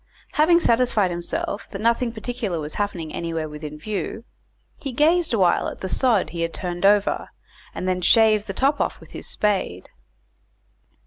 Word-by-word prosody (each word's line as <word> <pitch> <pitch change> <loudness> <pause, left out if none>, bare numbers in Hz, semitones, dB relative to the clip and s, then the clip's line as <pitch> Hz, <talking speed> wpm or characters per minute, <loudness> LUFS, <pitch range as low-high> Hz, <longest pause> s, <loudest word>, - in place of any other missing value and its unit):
Having 340 +3 +4
satisfied 230 - +2
himself 175 +4 -4
that 195 - -7
nothing 235 +2 +1
particular 225 -5 -3
was 150 0 -5
happening 180 -6 -3
anywhere 165 -2 -3
within 150 0 -8
view, 205 +5 -4 0.6
he 275 - -4
gazed 320 +6 +3
awhile 190 -7 +3
at - - -7
the 190 - -3
sod 225 0 +2
he 170 - -4
had 165 0 -2
turned 180 +1 0
over, 205 0 +2 0.5
and 185 - -3
then 180 -1 0
shaved 215 +2 +4
the 195 - -4
top 280 +2 +2
off - - -1
with - - -16
his - - -6
spade. 195 - -1
205 Hz, 165 wpm, -23 LUFS, 175-235 Hz, 0.6 s, Having